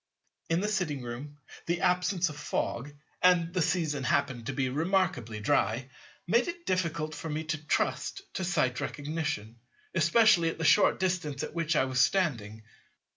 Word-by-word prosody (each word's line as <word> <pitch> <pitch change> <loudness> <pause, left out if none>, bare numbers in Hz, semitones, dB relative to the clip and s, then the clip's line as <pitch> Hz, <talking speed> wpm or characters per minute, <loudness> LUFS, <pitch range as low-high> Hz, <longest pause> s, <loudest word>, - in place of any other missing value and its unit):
In 165 +3 +1
a - - +1
sitting 175 -10 -1
room, 130 +5 -7 0.3
the 175 +1 0
absence 180 0 +2
of 150 - -8
Fog 145 -2 -3 0.3
(and 175 -2 +4
the 185 - +1
season 155 -4 0
happened 125 -2 0
to - - -2
be 135 -2 0
remarkably 145 - 0
dry), 115 +5 0 0.3
made 235 +7 +2
it 345 0 -6
difficult 165 -4 -1
for 160 - -6
me 155 +1 -2
to 155 -1 -4
trust 395 - -1
to 190 - -3
Sight 130 -8 0
Recognition, 145 -7 -4 0.3
especially 170 +1 +4
at - - -5
the 165 - -2
short 205 - +5
distance 175 -7 -1
at - - -5
which 165 -1 0
I - - +3
was 130 -1 +1
standing. 115 - 0
160 Hz, 165 wpm, -29 LUFS, 130-180 Hz, 0.3 s, short